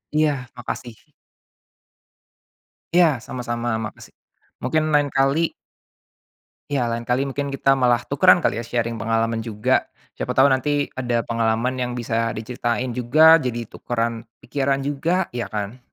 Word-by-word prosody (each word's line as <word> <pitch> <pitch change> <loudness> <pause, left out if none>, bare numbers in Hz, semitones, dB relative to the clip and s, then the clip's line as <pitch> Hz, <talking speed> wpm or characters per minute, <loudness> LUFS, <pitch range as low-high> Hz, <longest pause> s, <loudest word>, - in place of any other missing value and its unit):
Iya, 145 -5 +1
makasih. 120 -1 -6 2.0
Iya, 175 -1 +7 0.2
sama-sama, 120 -1 -4 0.2
makasih 110 - -9 0.5
mungkin 155 +5 +1
lain 145 -1 +3
kali 135 +2 +3 1.3
Iya, 125 -4 0
lain 115 0 -4
kali 125 +2 +1
mungkin 140 +1 -3
kita 135 0 +2
malah 120 -2 +3
tukeran 180 +4 +5
kali - - +1
ya 120 - -4
sharing 115 -1 -2
pengalaman 115 +2 0
juga, 110 -2 0 0.3
siapa - - -2
tahu 135 +2 +5
nanti 145 +2 +1
ada 120 -2 0
pengalaman 115 +2 0
yang 125 -1 -2
bisa 115 -1 -1
diceritain 120 +2 -2
juga, 155 +7 +6
jadi 120 -5 -4
tukeran 115 -1 -3 0.2
pikiran 135 -1 -1
juga, 165 +6 -1
ya, 120 -1 -4
kan? 105 +3 -5
125 Hz, 130 wpm, -22 LUFS, 115-140 Hz, 2.0 s, Iya